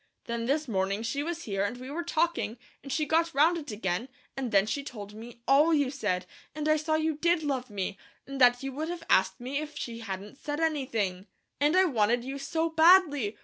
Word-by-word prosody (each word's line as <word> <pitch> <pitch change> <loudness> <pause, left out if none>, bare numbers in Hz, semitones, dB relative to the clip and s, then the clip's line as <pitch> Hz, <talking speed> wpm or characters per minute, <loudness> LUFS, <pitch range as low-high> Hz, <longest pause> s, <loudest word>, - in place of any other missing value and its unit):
Then 235 0 -3
this 300 +3 0
morning 195 0 -1
she 255 +5 -2
was 335 +2 -4
here, 195 -2 -1
and 205 +5 -2
we 255 +2 -8
were 330 +4 -2
talking, 330 -8 0 0.2
and 275 - -8
she 305 +2 +1
got 330 +2 +1
round 315 +5 +5
it 295 - -9
again, 205 +2 -2 0.3
and 260 -4 -3
then 195 -1 +4
she 280 +7 -2
told 210 -7 -8
me 235 +2 -11
ALL 300 +4 +5
you 285 -3 +1
said, 195 -9 -1 0.3
and 305 0 -2
I 310 - +5
saw 310 +1 0
you 315 -1 0
did 340 +1 +2
love 260 -4 -2
me, 195 -1 -4 0.3
and 275 -1 -6
that 245 +1 +5
you 270 - -3
would 310 +5 -4
have 345 -1 -5
asked 190 0 +3
me 260 +4 -3
if 300 -1 -7
she 230 -4 -5
hadn't 205 +2 -7
said 295 0 -4
anything, 225 - -1 0.3
and 295 +5 +3
I 375 - +6
wanted 240 - +2
you 270 +2 -5
so 320 +4 -1
badly. 320 - +5
270 Hz, 220 wpm, -29 LUFS, 220-310 Hz, 0.3 s, I